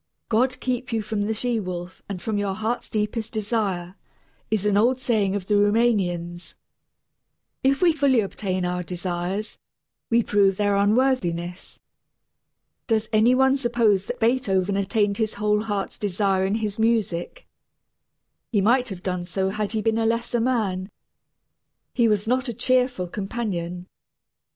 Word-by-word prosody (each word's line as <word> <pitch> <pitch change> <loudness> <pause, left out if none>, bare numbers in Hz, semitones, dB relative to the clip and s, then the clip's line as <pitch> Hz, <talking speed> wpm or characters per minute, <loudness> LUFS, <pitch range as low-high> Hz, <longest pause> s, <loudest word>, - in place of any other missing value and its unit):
"God 255 +3 +2
keep 250 -1 -2
you 225 -1 -1
from 210 0 -2
the 210 +2 0
she 240 +1 0
wolf 180 -2 -6
and 195 -2 -4
from 210 +3 -2
your 200 -1 -1
heart's 220 +3 -3
deepest 215 +1 -2
desire," 205 -5 -1 0.6
is 215 -2 0
an 205 -1 +2
old 245 +5 +3
saying 215 -6 +1
of 200 -3 -3
the 210 - 0
Rumanians. 200 -5 +1 1.1
If 275 +5 +2
we 340 -2 +5
fully 280 -5 +3
obtain 190 -2 -2
our 180 0 -1
desires, 180 +3 -4 0.5
we 235 0 +3
prove 195 -2 +3
their 205 -1 +2
unworthiness. 200 -5 0 1.1
Does 220 -1 +1
any 225 +4 +5
one 265 +1 +4
suppose 235 -7 +2
that - - -5
Beethoven 205 -5 +1
attained 200 +1 +1
his 220 -1 -1
whole 210 0 +1
heart's 205 -3 -3
desire 195 -1 +1
in 200 - 0
his 215 -1 -3
music? 220 - 0 1.0
He 215 - +2
might 245 +5 +3
have 190 -2 -7
done 180 -2 -2
so 190 +2 -1
had 210 +1 -3
he 215 -1 -1
been 225 0 +1
a 225 - +1
lesser 235 +1 0
man. 210 -7 0 1.0
He 235 -2 +3
was 210 0 +1
not 255 +3 +1
a 235 - -4
cheerful 250 -7 +1
companion. 180 -3 -4
210 Hz, 150 wpm, -24 LUFS, 190-235 Hz, 1.1 s, we